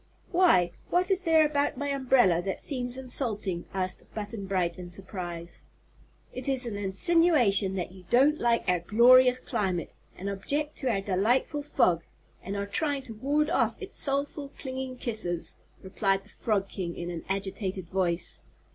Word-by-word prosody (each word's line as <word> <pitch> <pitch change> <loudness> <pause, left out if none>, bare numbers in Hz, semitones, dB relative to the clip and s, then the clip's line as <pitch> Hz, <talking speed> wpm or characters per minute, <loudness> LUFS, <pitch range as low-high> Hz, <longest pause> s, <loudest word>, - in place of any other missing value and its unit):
"Why, 340 - +4 0.2
what 360 +2 +1
is 385 0 +3
there 325 -3 +4
about 290 -2 0
my 285 +1 -2
umbrella 255 -10 +3
that 195 +1 -4
seems 250 -3 -1
insulting?" 215 -8 -2
asked 185 -1 -2
Button 210 -2 -5
Bright, 180 -3 -1
in 175 -1 -8
surprise. 175 -2 -5 0.7
"It 255 +2 -4
is 265 -2 +2
an 230 -3 -4
insinuation 205 - +3
that 180 -2 -3
you 185 0 -14
don't 280 +5 +4
like 235 -1 +2
our 180 -1 +3
glorious 250 +7 +6
climate, 200 -9 -2 0.2
and 195 - -6
object 285 +10 -1
to 265 - -1
our 200 -4 0
delightful 220 +10 +1
fog, 180 - +2 0.4
and 195 +2 -5
are 200 0 -2
trying 280 +6 -1
to 240 -3 -8
ward 290 +7 0
off - - +1
its 395 +1 -1
soulful, 280 +1 0
clinging 260 -1 -5
kisses," 215 -9 -3 0.3
replied 195 0 0
the - - -15
Frog 205 -3 -1
King, 175 -3 -5
in 175 0 -4
an 165 -2 -6
agitated 190 -1 -3
voice. 175 -1 -2
215 Hz, 160 wpm, -28 LUFS, 190-275 Hz, 0.7 s, glorious